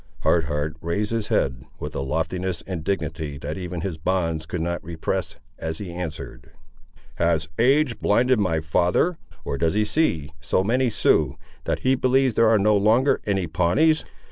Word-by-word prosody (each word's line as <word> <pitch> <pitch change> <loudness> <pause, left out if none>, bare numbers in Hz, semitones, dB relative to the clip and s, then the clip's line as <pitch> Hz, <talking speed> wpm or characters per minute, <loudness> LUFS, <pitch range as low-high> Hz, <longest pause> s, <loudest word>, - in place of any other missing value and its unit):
Hard 85 -3 +2
Heart 75 +2 -2
raised 100 +6 -1
his 115 -2 -1
head, 65 -2 0 0.2
with - - -5
a - - -3
loftiness 80 +6 -2
and 90 -5 -5
dignity 80 -5 -3
that 75 +3 -5
even 90 -1 -5
his 85 -4 -4
bonds 85 -3 -1
could 90 - -3
not 85 0 -2
repress, 80 0 -3 0.2
as 80 0 -3
he 90 -4 -6
answered— 80 -7 -7 0.6
"Has 85 -2 +1
age 130 0 +3
blinded 125 +3 +3
my 85 -6 +1
father; 90 - +1 0.3
or 70 - -3
does 80 +3 +1
he 105 0 +2
see 85 - 0
so 95 +5 +1
many 125 +5 +2
Siouxes, - - +2 0.3
that - - -1
he 130 - +3
believes 130 0 +2
there 115 +1 +4
are 110 - +5
no 105 +1 +3
longer 110 +7 +3
any 95 -3 +1
Pawnees?" 90 - +2
90 Hz, 170 wpm, -24 LUFS, 80-110 Hz, 0.6 s, are